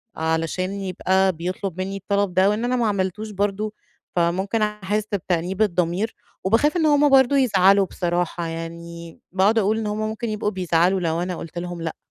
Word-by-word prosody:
علشان 160 +3 -1
يبقى 190 0 +1
بيطلب 180 +2 -4
مني 195 +1 -3
الطلب 200 -1 -1
ده، 190 +2 +4
وإن 215 +3 0
أنا 250 +1 +1
ما 235 -3 +1
عملتوش 205 +2 -2
برضه، 205 +1 -1 0.4
فممكن 190 +6 +1
أحس 210 0 -1
بتأنيب 185 +1 -1
الضمير، 180 +2 0 0.3
وباخاف 260 - +2
إن 320 - +2
هُم 290 -1 +4
برضه 270 0 +5
يزعلوا 200 -5 +4
بصراحة 175 -1 -2
يعني، 170 0 -7
باقعد 200 +4 +3
أقول 215 +2 +1
إن 220 -1 -2
هُم 210 +1 -2
ممكن 220 +1 -3
يبقوا 215 0 -1
بيزعلوا 180 0 +2
لو 165 -1 -1
أنا 180 0 -2
قلت 165 +1 -8
لهم 175 -1 -5
لأ. 165 -1 -4
190 Hz, 170 wpm, -23 LUFS, 175-215 Hz, 0.4 s, برضه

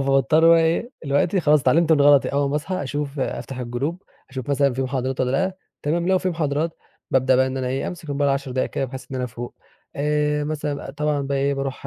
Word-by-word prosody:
فباضطر 140 +4 +4
بقى 165 0 +7
إيه، 165 +9 0
دلوقتي 150 +7 +1
خلاص 150 -2 +4
اتعلمت 160 +5 +3
من 150 - +3
غلطي، 145 -1 +6
أول 140 0 0
ما 145 - 0
أصحى 185 +4 -3
أشوف 145 +1 -4
أفتح 130 0 -4
الGroup 125 +7 -2 0.4
أشوف 130 -1 -6
مثلًا 140 -1 +2
في 135 - -1
محاضرات 130 0 -2
والّا 125 -1 +1
لأ، 185 +7 0 0.3
تمام، 170 +4 0
لو 190 0 +4
في 185 - -1
محاضرات 160 -1 -1 0.4
بابدأ 130 0 +3
بقى 130 0 +3
إن 130 0 -4
أنا 130 -1 -2
إيه، 135 +1 -2
أمسك 170 -3 -9
الmobile 140 0 -1
10 140 -1 0
دقايق 130 0 -1
كده، - - -2
بحيث 130 +1 -8
إن - - -5
أنا 125 - -1
أفوق. 120 0 -7 0.4
آآ، 150 0 0
مثلًا 150 -2 -3
أ - - -4
طبعًا 150 0 -1
بقى 140 0 -1
إيه، 140 +1 +1
بارُوح 135 0 -4
140 Hz, 230 wpm, -22 LUFS, 135-150 Hz, 0.4 s, بقى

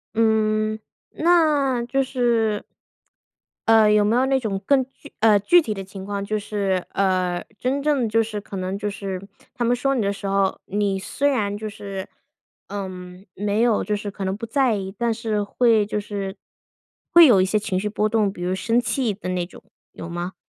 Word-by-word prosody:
嗯， 215 -1 +2 0.3
那， 300 -7 +2
就 270 +3 +1
是 235 -5 0 1.0
呃， 220 -1 +6
有 210 0 +4
没 210 +3 +2
有 255 +2 +3
那 270 0 +2
种 210 -6 -2
更 275 +1 +4
具 290 - -16
呃， 215 -2 +5
具 345 - +5
体 220 -9 -3
的 195 -1 -6
情 190 0 -9
况？ 200 0 -3
就 215 +1 -1
是， 200 -3 -1
呃 185 -2 0 0.2
真 270 +3 -1
正 285 -5 +2
就 225 +1 +3
是 215 -2 -5
可 195 - -8
能 185 +1 -3
就 205 +1 -2
是 195 -2 -5 0.3
他 240 - -3
们 240 +1 +2
说 275 +3 0
你 255 - 0
的 200 -1 +1
时 200 0 -7
候， 195 -1 +1
你 200 -1 0
虽 275 +9 0
然 205 -7 0
就 215 0 -5
是， 200 -2 -7 0.6
嗯 185 -2 -7
没 205 +2 0
有 235 -2 +2
就 210 - -1
是 205 0 -4
可 195 -1 -5
能 190 0 -1
不 220 - -6
在 255 -1 +2
意， 190 -1 -5
但 235 0 +1
是 220 -2 -2
会 225 0 +3
就 210 +1 -2
是 200 -2 -5 0.8
会 340 -2 +9
有 205 -8 +6
一 - - +3
些 210 +3 +1
情 205 -3 -2
绪 210 - -2
波 215 0 0
动， 215 -3 +1
比 175 - -10
如 180 +1 0
生 230 +5 +1
气 245 -3 -1
的 195 -2 -7
那 180 -1 -1
种， 175 - -15 0.3
有 165 - -8
吗？ 175 +2 -4
210 Hz, 215 characters per minute, -23 LUFS, 195-235 Hz, 1.0 s, 会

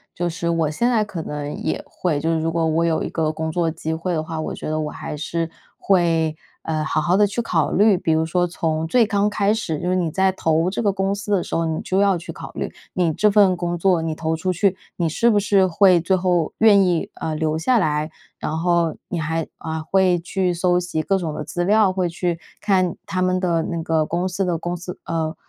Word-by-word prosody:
就 175 0 -1
是 170 0 -3
我 165 -2 +1
现 235 +11 +1
在 225 -3 +2
可 195 -5 -5
能 150 -1 -5
也 - - -3
会， 170 -5 -2
就 160 +3 -1
是 160 - +1
如 160 +1 0
果 165 0 0
我 160 +1 +1
有 165 -1 +1
一 - - -3
个 160 -2 0
工 160 0 -3
作 170 0 0
机 160 0 -4
会 165 +3 -2
的 155 -2 -1
话， 160 0 -5
我 155 - -4
觉 - - -6
得 155 0 -1
我 155 -1 -2
还 150 - -6
是 165 +2 -2 0.3
会， 165 -4 +2 0.3
呃， 155 -1 -2
好 155 - 0
好 175 +5 +2
地 205 0 +5
去 205 +4 -2
考 165 -9 0
虑。 205 -1 +5
比 165 -2 0
如 160 0 +2
说 175 +2 +1
从 160 -2 -2
最 240 +6 +4
刚 205 -1 +1
开 205 0 +1
始， 190 -8 -2
就 180 - -1
是 185 - +2
你 175 -3 0
在 190 +3 +2
投 165 -2 +1
这 195 - -3
个 205 -3 +1
公 195 0 0
司 205 +1 -3
的 185 -4 +2
时 - - -9
候， 165 - +1
你 160 -1 -2
就 190 - 0
要 200 -2 +3
去 170 - -8
考 - - -9
虑 - - -4 0.2
你 175 -3 +1
这 210 +7 +3
份 200 -2 +5
工 175 0 -2
作， 180 -1 +2
你 160 -1 -2
投 160 0 -2
出 185 +3 -1
去， 190 +1 +1 0.2
你 170 -2 0
是 230 +9 +2
不 215 - +3
是 195 -2 +3
会 185 0 +5
最 175 +3 +1
后 180 -3 +1
愿 215 -3 +6
意， 175 -3 0
呃， 155 - -3
留 155 0 0
下 235 +10 +2
来， 155 -5 0 0.3
然 155 - -3
后 170 -1 +1
你 175 - -2
还 160 +1 -1
呃， 160 -1 -4
会 190 -2 +4
去 180 +1 -1
搜 180 +1 +2
集 175 -3 -2
各 195 - +1
种 165 -5 -3
的 150 - -4
资 175 +3 -3
料， 210 0 +4
会 185 -1 0
去 170 0 -2 0.2
看 185 -4 +1
他 185 - -2
们 185 0 +1
的 170 -3 +1
那 170 -2 -3
个 160 -2 +1
公 175 +3 -2
司 190 +2 -1
的 175 -2 0
公 175 +2 -3
司， 180 +1 -8
呃， 160 -1 -2
175 Hz, 265 characters per minute, -21 LUFS, 160-190 Hz, 0.3 s, 愿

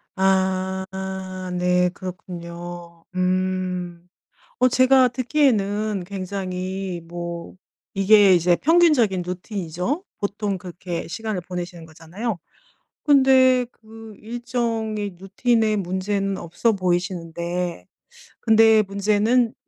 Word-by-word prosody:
아. 190 0 +1 0.8
네, 180 0 +2
그렇군요. 175 -2 -8
음. 185 -1 -1 0.5
어, 255 - +5
제가 255 +1 +5
듣기에는 215 -6 +1
굉장히 185 -1 -4
뭐 170 +1 -6 0.4
이게 195 0 +6
이제 175 0 +4
평균적인 295 - +3
루틴이죠. 180 - -3 0.2
보통 200 -1 -2
그렇게 175 -2 -6
시간을 210 +1 -4
보내시는 175 -1 -6
거잖아요. 170 +7 -5 0.7
근데 260 -3 +5
그 220 -1 -13
일정의 225 -4 -3
루틴에 215 +3 +1
문제는 195 +1 -1
없어 175 +7 0
보이시는데 175 - -2 0.6
근데 220 -1 +6
문제는 210 +4 +1
190 Hz, 215 characters per minute, -23 LUFS, 180-220 Hz, 0.8 s, 이게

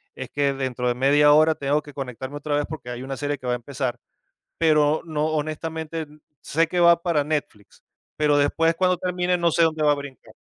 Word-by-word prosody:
es 130 - -7
que 140 -1 +1
dentro 130 -2 -3
de 120 - +1
media 145 +3 +5
hora 155 +1 +5
tengo 145 +1 -1
que 145 -1 -12
conectarme 130 +1 -6
otra 145 0 -2
vez, 145 - 0
porque 150 -6 -8
hay 120 +1 -6
una 135 0 -5
serie 145 0 -2
que 130 - -13
va 125 - 0
a - - +1
empezar, 130 0 -4 0.6
pero 155 -1 +3
no, 155 -1 -1
honestamente, 160 +1 -4 0.3
sé 165 +2 +1
que 175 +1 -2
va 170 0 +6
para 165 -5 +1
Netflix, 145 -9 -5 0.4
pero 150 -1 +3
después, 165 +3 +2
cuando 180 +1 +2
termine, 180 0 -1
no 170 -1 +1
sé 170 - +3
dónde 160 -1 +1
va 150 - +5
a - - -1
brincar. 140 -2 -10
150 Hz, 210 wpm, -23 LUFS, 140-160 Hz, 0.6 s, va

